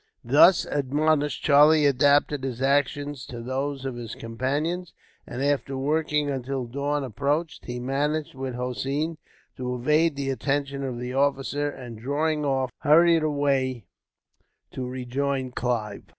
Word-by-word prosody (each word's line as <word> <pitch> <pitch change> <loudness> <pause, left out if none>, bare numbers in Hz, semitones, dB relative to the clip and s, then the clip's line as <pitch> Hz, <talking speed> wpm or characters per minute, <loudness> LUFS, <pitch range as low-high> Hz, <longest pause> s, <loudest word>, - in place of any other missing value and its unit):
Thus 150 +8 +6
admonished, 145 +1 0
Charlie 150 +1 +6
adapted 145 +1 +3
his 130 -3 -4
actions 145 0 0
to 120 - -7
those 135 +3 -3
of 135 - -3
his 120 -2 -7
companions 145 +10 -3 0.3
and, 130 - -4
after 140 -1 0
working 150 +1 0
until 135 -1 -3
dawn 140 +4 -2
approached, 145 +7 -2
he 125 0 -5
managed, 145 +4 -1
with 130 -2 -5
Hossein, 135 +6 -2 0.4
to 125 -1 -3
evade 150 +5 +2
the 140 -1 -2
attention 140 +2 -2
of 130 -3 -3
the 125 +1 -5
officer; 140 +1 0
and, 120 -5 -9
drawing 150 +5 -1
off, 135 -2 0
hurried 165 +2 +5
away 135 -6 0 0.9
to 130 -1 -5
rejoin 130 +1 -2
Clive. 115 -5 -2
140 Hz, 135 wpm, -25 LUFS, 130-145 Hz, 0.9 s, Thus